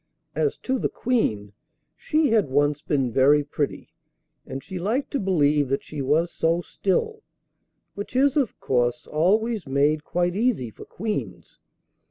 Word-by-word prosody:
As 435 - 0
to 260 -1 0
the - - 0
Queen, 110 - -1 0.4
she 310 -2 +1
had 215 -9 +2
once 145 +2 +1
been 135 -5 0
very 140 +4 +4
pretty, 145 0 -4 0.5
and 135 0 -6
she 185 -1 -6
liked 225 +10 -1
to 280 - -1
believe 150 -7 +2
that 135 - -1
she 150 -2 -6
was 155 +6 +1
so 165 +1 +1
still, 440 - -1 0.7
which 205 +5 -7
is, 275 +1 +3
of 275 -7 0
course, 125 +3 0
always 205 +4 +1
made 145 +3 +2
quite 175 +2 -1
easy 210 - 0
for - - -12
queens. 215 +2 -5
165 Hz, 150 wpm, -24 LUFS, 145-225 Hz, 0.7 s, very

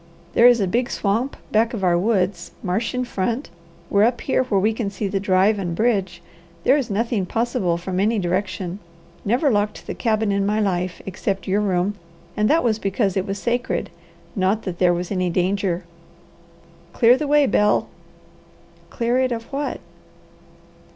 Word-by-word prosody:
There 235 - +7
is 245 -1 +5
a 200 - +2
big 240 +7 0
swamp 225 +7 -1
back 225 +2 +2
of 200 - -5
our 175 -1 +3
woods, 185 -2 0
marsh 210 +7 -1
in 250 0 -1
front, 235 - -2 0.4
we're 200 - +2
up 240 0 0
here 260 - +1
where 200 -5 +1
we 215 +3 +2
can 220 -2 -2
see 200 +1 -3
the 195 0 -1
drive 195 +2 +2
and 175 -3 -3
bridge. 190 -5 0 0.4
There 265 - +5
is 275 -5 -1
nothing 215 -2 -1
possible 225 -7 0
from 180 +1 -3
any 215 +3 +2
direction. 185 0 -2 0.4
Never 250 +7 +2
locked 205 -1 -1
the - - -4
cabin 220 -3 0
in 200 0 +1
my 210 +2 +1
life, 180 -3 -1
except 195 +1 -3
your 200 +2 +1
room, 190 0 0 0.4
and 210 0 +2
that 325 +2 +3
was 220 -3 +1
because 195 -1 0
it 190 +1 -1
was 195 0 -3
sacred, 240 +4 -2 0.4
not 195 +2 +1
that 180 -3 -5
there 180 -1 +4
was 175 +1 -3
any 185 -2 0
danger. 185 0 0 1.1
Clear 240 +1 +5
the 300 +2 -3
way, 295 0 +4
Bel!" 210 -5 +2 1.0
"Clear 240 +1 0
it 260 -1 +1
of 230 -1 -3
what?" 280 0 -2
205 Hz, 175 wpm, -22 LUFS, 185-235 Hz, 1.1 s, There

